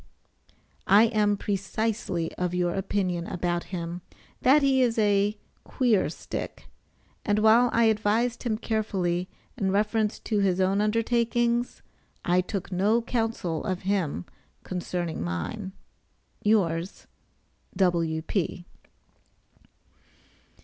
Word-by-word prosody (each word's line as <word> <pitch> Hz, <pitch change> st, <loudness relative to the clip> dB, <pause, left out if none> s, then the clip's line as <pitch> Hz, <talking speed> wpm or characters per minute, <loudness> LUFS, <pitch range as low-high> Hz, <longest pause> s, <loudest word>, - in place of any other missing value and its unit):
I 205 Hz, +3 st, +7 dB
am 210 Hz, -3 st, +2 dB
precisely 200 Hz, -3 st, -2 dB
of 180 Hz, -1 st, -2 dB
your 175 Hz, -1 st, +1 dB
opinion 185 Hz, -3 st, -1 dB
about 175 Hz, -1 st, -2 dB
him, 175 Hz, -1 st, -5 dB, 0.4 s
that 280 Hz, +3 st, +5 dB
he 265 Hz, -1 st, +4 dB
is 235 Hz, -2 st, +2 dB
a 205 Hz, -1 st, +2 dB, 0.3 s
"queer 235 Hz, -7 st, +1 dB
stick," -, -, -6 dB, 0.6 s
and 205 Hz, 0 st, +1 dB
while 220 Hz, +3 st, +5 dB
I 235 Hz, -, +3 dB
advised 220 Hz, +2 st, +1 dB
him 225 Hz, -4 st, -1 dB
carefully 190 Hz, -6 st, -1 dB, 0.3 s
in 195 Hz, -5 st, 0 dB
reference 210 Hz, +2 st, +1 dB
to 215 Hz, -3 st, -1 dB
his 190 Hz, -2 st, +2 dB
own 190 Hz, +2 st, +2 dB
undertakings, 235 Hz, +2 st, 0 dB, 0.4 s
I 180 Hz, +1 st, +3 dB
took 195 Hz, +1 st, -5 dB
no 210 Hz, +6 st, +2 dB
counsel 225 Hz, -9 st, -2 dB
of 185 Hz, 0 st, -3 dB
him 180 Hz, -, -1 dB, 0.4 s
concerning 175 Hz, -2 st, -3 dB
mine. 85 Hz, -, -4 dB, 0.7 s
Yours, 185 Hz, -5 st, 0 dB, 0.7 s
W.P. 175 Hz, 0 st, 0 dB
200 Hz, 105 wpm, -26 LUFS, 180-225 Hz, 0.7 s, I